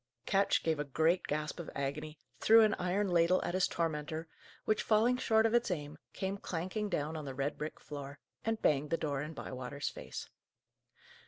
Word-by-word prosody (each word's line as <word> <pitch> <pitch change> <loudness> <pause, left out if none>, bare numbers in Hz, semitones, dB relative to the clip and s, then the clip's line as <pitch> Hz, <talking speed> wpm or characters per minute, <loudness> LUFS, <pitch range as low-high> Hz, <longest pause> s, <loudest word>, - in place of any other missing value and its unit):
Ketch 195 0 +2
gave 160 -2 +1
a - - +1
great 160 +5 +1
gasp 150 +2 -2
of 170 - -5
agony, 150 +3 -3 0.2
threw 225 +1 +7
an 215 -1 +5
iron 185 +3 +1
ladle 175 0 +4
at - - -2
his 185 0 +3
tormentor, 160 0 -2 0.4
which, 215 - +2
falling 225 +3 +4
short 225 -3 +3
of 225 - +2
its 240 -2 +3
aim, 150 -3 -4
came 195 +1 -3
clanking 190 +5 -3
down 155 -2 -1
on 155 -2 -5
the 135 -1 -5
red 140 +2 -1
brick 155 +1 -5
floor, 140 -1 -7 0.3
and 225 0 0
banged 150 0 +2
the 165 - +1
door 145 -4 -1
in 155 +2 -6
Bywater's 130 +2 -4
face. - - -7
160 Hz, 185 wpm, -33 LUFS, 150-195 Hz, 0.4 s, threw